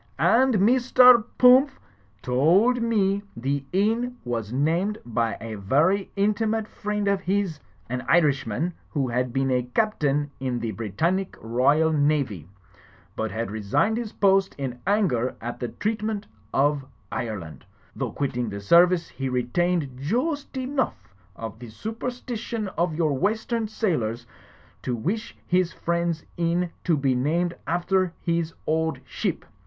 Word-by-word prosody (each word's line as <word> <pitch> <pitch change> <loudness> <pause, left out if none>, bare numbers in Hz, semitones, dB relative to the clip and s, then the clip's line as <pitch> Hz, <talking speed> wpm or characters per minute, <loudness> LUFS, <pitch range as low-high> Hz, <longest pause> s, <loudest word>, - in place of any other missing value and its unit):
"And 255 +2 +4
Mr. 245 +2 +6
Pumph 260 +3 +6 0.4
to 125 - -5
old 195 - +4
me 200 -4 +1 0.2
the 135 +3 -1
inn 225 +6 +1
was 115 -3 -3
named 165 - +1
by 115 -1 -1
a 110 -1 -6
vary 160 - +2
intimate 215 +2 +1
friend 210 -1 -3
of 200 -1 +2
his, 190 -4 -1 0.3
an 125 +1 -3
Irishman 150 -1 +2 0.2
who 135 -4 -1
had 125 +1 -1
been 135 +1 0
a 125 -1 +2
Captain 150 -10 +1
in 130 -2 -2
the 115 -2 -3
Britannic 165 - -1
Roysl 140 +8 +2
Navy, 140 - 0 0.7
but 110 - -2
had 110 -2 -3
resigned 110 - +1
his 235 -3 -4
po 195 -1 +4
ost 195 0 -3
in 130 -3 -4
anger 175 - +1
at 120 +1 -6
the 120 - -2
treatment 215 - -2 0.3
of 145 0 +2 0.3
Ire 110 -3 -3
land. 80 -3 -11 0.3
Though - - -3
quitting 125 -4 -2
the 100 0 -5
service, 170 - +4
he 135 +1 -4
retained 130 +3 0
joost 265 - -2
enough 260 - -2 0.2
of 110 0 -7
the 120 -1 -9
superstition 225 - -4
of 170 -3 -1
your 155 -3 +1
western 220 - 0
sailors, 125 - -1 0.6
to 125 - -2
wish 195 - -3
his 180 0 +2
friend's 170 -1 -1
inn 170 +1 0
to 165 -4 +3
be 135 -2 +1
named 165 +7 0
after 180 +1 +1
his 170 -1 -1
old 160 +1 0
ship. - - -3
170 Hz, 140 wpm, -25 LUFS, 125-210 Hz, 0.7 s, Mr